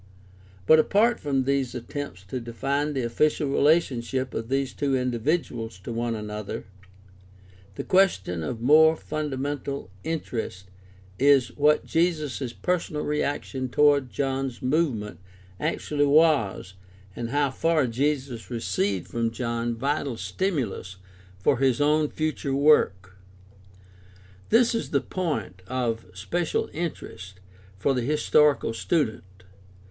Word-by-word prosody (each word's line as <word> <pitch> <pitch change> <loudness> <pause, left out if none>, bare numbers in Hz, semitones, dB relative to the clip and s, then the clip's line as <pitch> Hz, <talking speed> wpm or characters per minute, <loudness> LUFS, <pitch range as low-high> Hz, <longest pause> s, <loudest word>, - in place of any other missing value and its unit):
But 155 +7 +7
apart 220 +8 +3
from 135 -3 0
these 135 -2 0
attempts 125 -4 -6
to 100 +7 -5
define 140 +5 -2
the 130 -3 -1
official 150 +5 +1
relationship 135 -4 +1
of 115 +1 -4
these 135 0 0
two 140 -2 0
indi 125 -2 -1
viduals 115 - -2
to - - -5
one 115 0 -1
another, 105 -1 -5 1.1
the - - -4
question 175 - +2
of 110 +9 -4
more 160 +5 +6
fundamental 145 -6 -4
interest 110 - -4 0.5
is 140 -1 +5
what 150 +1 +3
Jesus' 155 -7 0
personal 170 +1 -2
reaction 140 -3 -2
toward 145 -1 +3
John's 135 -2 -2
movement 125 - -1 0.4
actually 145 -1 0
was 140 - +3 0.4
and 115 -1 -4
how 140 +1 +1
far 160 +1 +2
Jesus 130 -1 -2
received 100 -5 -1
from 115 -1 -1
John 115 0 -2
vital 140 0 -1
stimulus 125 - -2 0.4
for 95 - +2
'his 130 -3 +2
own 150 +1 +3
future 155 -3 -2
work. 95 -11 +3 1.3
This 235 +1 +4
is 230 - -2
the - - +1
point 115 - -3
of 115 -5 -2
special 160 - -2
interest 100 - -6 0.4
for 135 +8 +1
the 125 - 0
historical 150 -1 +3
student. 130 -2 0
135 Hz, 120 wpm, -26 LUFS, 115-150 Hz, 1.3 s, But